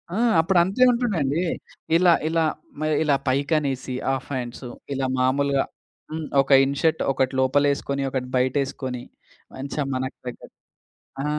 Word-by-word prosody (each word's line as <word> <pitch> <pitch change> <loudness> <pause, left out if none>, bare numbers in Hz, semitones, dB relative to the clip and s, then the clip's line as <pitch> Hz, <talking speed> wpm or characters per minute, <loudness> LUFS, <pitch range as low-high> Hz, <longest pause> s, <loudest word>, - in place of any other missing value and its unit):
ఆ! - - -1 0.2
అప్పుడు 175 +2 +3
అంతే 195 +8 +2
ఉంటుందండి. 180 - 0 0.5
ఇలా 175 0 +5
ఇలా 165 0 +2 0.3
మ - - -7 0.2
ఇలా 145 -2 +3
పైకి 140 +4 +1
అనేసి 135 -3 -3 0.2
ఆఫ్ 135 -1 -4
హ్యాండ్సు 125 0 -5 0.2
ఇలా 135 -1 -1
మాములుగా 135 +2 +2 0.5
హ్మ్. 160 -1 -4
ఒక 135 - -4
ఇన్ 140 0 -2
షర్ట్ 160 -1 +2
ఒకటి 130 0 0
లోపల 140 +2 +3
ఏసుకొని 140 0 -3
ఒకటి 125 -1 -2
బయట 130 +2 +1
ఏసుకొని 125 -2 -5 0.5
మంచిగ 140 +2 -3
మనకు 130 +1 -3
తగ్గట్టు. 125 - -9 0.7
ఆ! - - -3
140 Hz, 150 wpm, -24 LUFS, 130-160 Hz, 0.7 s, ఇలా